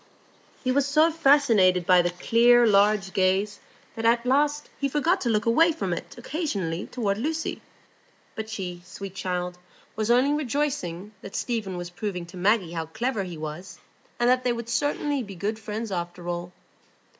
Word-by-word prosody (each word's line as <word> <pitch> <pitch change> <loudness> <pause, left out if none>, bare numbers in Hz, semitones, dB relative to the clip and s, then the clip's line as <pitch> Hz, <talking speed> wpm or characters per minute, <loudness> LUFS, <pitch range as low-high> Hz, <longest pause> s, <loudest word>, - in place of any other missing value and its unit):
He 255 - +1
was 280 +1 +2
so 310 +3 +4
fascinated 240 - +4
by 180 0 +6
the 175 - 0
clear, 235 +7 +4
large 200 -2 +3
gaze 190 +2 +1 0.4
that 225 - -5
at 235 +1 +3
last 290 +3 +2
he 280 - 0
forgot 320 +7 +1
to 240 - 0
look 215 -1 +1
away 325 +9 +5
from 325 - -2
it - - -7
occasionally 200 - -3
toward 205 -5 -2
Lucy; 315 +5 -2 0.7
but 220 0 -6
she, 180 -5 -5
sweet 185 +1 -8
child, 180 -1 -3 0.4
was 215 0 -2
only 255 +4 +4
rejoicing 265 - -2
that 195 - -9
Stephen 215 -7 -2
was 175 0 -6
proving 180 -2 -4
to 170 +2 -13
Maggie 190 -1 +2
how 165 -1 -3
clever 230 +6 -2
he 175 -3 -7
was, 155 +4 -7 0.4
and 240 - +3
that 255 +1 +3
they 245 - +1
would 235 0 -6
certainly 290 +2 0
be 200 -5 -8
good 210 +5 -3
friends 215 0 -5
after 175 -1 -4
all. 175 0 -4
215 Hz, 170 wpm, -26 LUFS, 180-255 Hz, 0.7 s, by